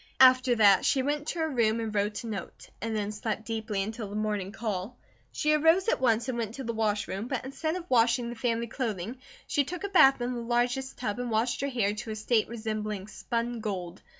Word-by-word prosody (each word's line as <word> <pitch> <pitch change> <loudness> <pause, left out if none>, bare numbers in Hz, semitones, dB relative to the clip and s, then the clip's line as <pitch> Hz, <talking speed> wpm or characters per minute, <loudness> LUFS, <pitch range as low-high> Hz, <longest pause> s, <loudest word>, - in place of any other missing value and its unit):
After 255 -1 +7
that 205 -4 +6
she 265 - +2
went 295 +2 -1
to - - -3
her 320 - +1
room 230 -4 +2
and 220 -2 -3
wrote 205 +1 -1
a - - -6
note, 200 -5 -7
and 225 +1 -2
then 210 -1 -1
slept 215 +1 -3
deeply 220 -3 -2
until 220 0 -5
the 205 - -7
morning 210 -3 -1
call. 215 0 -4 0.3
She 305 0 +1
arose 325 +6 +4
at - - +1
once 230 -1 +2
and 245 -2 -2
went 225 0 -3
to 270 - -6
the 235 -1 -3
wash 215 -2 0
room 200 +5 -4
but 255 -2 -3
instead 315 +5 -2
of 360 -1 -6
washing 235 -1 +3
the 240 - -6
family 230 0 0
clothing, 230 -2 -4 0.3
she 290 - +1
took 350 +6 -6
a 400 - -2
bath 310 -9 +6
in 245 +1 -2
the 240 - -4
largest 245 +3 0
tub, 225 -2 -3
and 245 -1 -2
washed 230 +3 0
her 280 - 0
hair 220 -6 +1
to 215 +2 -6
a 215 - -3
state 215 +1 +1
resembling 215 -3 -4
spun 235 +2 -3
gold. 190 -5 -4
230 Hz, 230 wpm, -28 LUFS, 215-255 Hz, 0.3 s, After